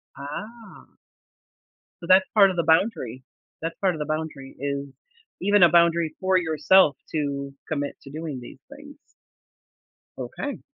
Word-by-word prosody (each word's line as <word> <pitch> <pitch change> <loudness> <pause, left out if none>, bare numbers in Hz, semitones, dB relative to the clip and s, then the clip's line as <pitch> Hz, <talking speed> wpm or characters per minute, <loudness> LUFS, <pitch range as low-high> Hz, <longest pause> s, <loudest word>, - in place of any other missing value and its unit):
Ah. 215 +12 -9 1.1
So, - - -7
that's 190 0 +6
part 200 -3 +6
of 185 - -3
the 170 - 0
boundary. 160 - +1 0.4
That's 165 0 -4
part 190 -2 +2
of 155 - -7
the 150 - -2
boundary, 155 -3 -5
is 140 0 -3 0.5
even 205 -1 +4
a 170 - +8
boundary 170 -2 +3
for 185 0 +3
yourself 160 -1 +4 0.2
to 140 -2 -3
commit 145 -2 -3
to 140 - -12
doing 155 -4 -5
these 125 +2 -12
things. 290 0 -14 1.2
Okay. 285 -2 -5
160 Hz, 140 wpm, -24 LUFS, 140-190 Hz, 1.2 s, a